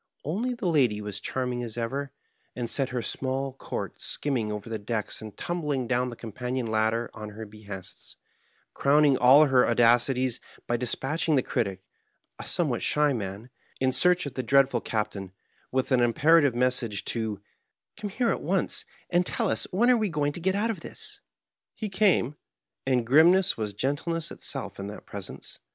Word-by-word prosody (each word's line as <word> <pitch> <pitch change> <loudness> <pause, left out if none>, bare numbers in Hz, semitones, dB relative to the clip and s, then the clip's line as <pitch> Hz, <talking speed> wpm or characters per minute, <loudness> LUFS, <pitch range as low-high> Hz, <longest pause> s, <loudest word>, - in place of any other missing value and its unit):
Only 225 - -1
the 235 -4 -6
lady 135 -11 +3
was 105 -1 -5
charming 125 +2 -2
as 115 -1 -4
ever, 135 +4 -3 0.4
and 120 -1 -3
set 130 +3 0
her 125 -2 -3
small 135 0 -2
court 135 - -6
skimming 125 -7 0
over 105 0 -5
the 115 -1 -4
decks 105 0 -3
and 110 -2 -9
tumhling 150 -7 -2
down 125 +1 +1
the 120 - -7
com 115 -1 -8
panion 125 +2 -3
ladder 110 +1 0
on 105 0 -7
her 110 +1 -8
hehests, 100 -3 -9 0.6
crowning 145 0 +4
all 135 +5 +7
her 130 -3 +4
audacities 120 +1 +3 0.3
hy 120 - +1
dis 120 0 +1
patching 155 +3 0
the 130 - +3
Critic 95 -4 -2 0.3
— - - -39
a - - -8
somewhat - - +1
shy 150 -1 +2
man 105 +1 -5
— - - -26
^in 130 0 +2
search 180 +6 +3
of 140 - -5
the 130 - -2
dread 135 +2 +4
ful 120 -3 -1
Captain, 105 -4 -3 0.4
with 130 +1 -1
an 130 -1 +4
imperative 145 +3 +4
message 120 -4 +1
to 110 -2 -1
'^ 100 - -21 0.5
Come 210 -1 -5
here 235 +3 +1
at - - -2
once, 185 +4 0 0.3
and 175 0 +4
tell - - -1
us - - +1
when 240 +7 +4
we 215 - +1
are - - -4
going 145 -3 0
to 160 - -7
get 190 +3 +1
out 220 +3 +1
of 205 - -6
this.'' - - -8 0.6
He 215 - -4
came, 190 - +2 0.5
and 125 -3 +2
grimness 170 +9 +5
was 105 -3 -4
gentleness 145 +7 -2
itself - - -4
in 100 - -4
that 105 - -9
presence. 100 -2 -7
130 Hz, 185 wpm, -27 LUFS, 110-150 Hz, 0.6 s, all